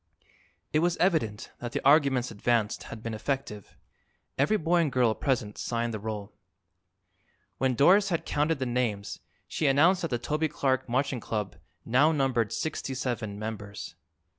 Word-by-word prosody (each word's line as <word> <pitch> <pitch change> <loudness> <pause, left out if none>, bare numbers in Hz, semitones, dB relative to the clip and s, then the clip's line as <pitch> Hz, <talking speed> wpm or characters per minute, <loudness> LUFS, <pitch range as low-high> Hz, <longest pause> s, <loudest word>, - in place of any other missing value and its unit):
It 155 - +4
was 175 +1 +1
evident 150 - 0
that 120 -1 -6
the - - -3
arguments 140 -4 +4
advanced 110 0 0
had 115 -1 -8
been 115 - -4
effective. 110 -3 -4 0.6
Every 150 +11 +2
boy 170 0 +1
and 155 -4 0
girl 125 -3 +3
present 120 -6 -2
signed 115 -1 -2
the 110 - -3
roll. 105 -1 -5 1.3
When 130 -1 +1
Doris 195 - +5
had 170 -3 -1
counted 150 +2 +1
the 130 - -2
names 120 -5 -2 0.3
she 155 - -1
announced 165 +8 +4
that 165 - -1
the 120 - 0
Toby 150 +6 -1
Clark 130 -3 -1
Marching 130 +1 0
Club 105 -4 -3 0.3
now 140 +7 +4
numbered 130 -7 +1
sixty 145 -4 -3
seven 120 -5 -3
members. 105 -5 -6
130 Hz, 155 wpm, -28 LUFS, 110-150 Hz, 1.3 s, Doris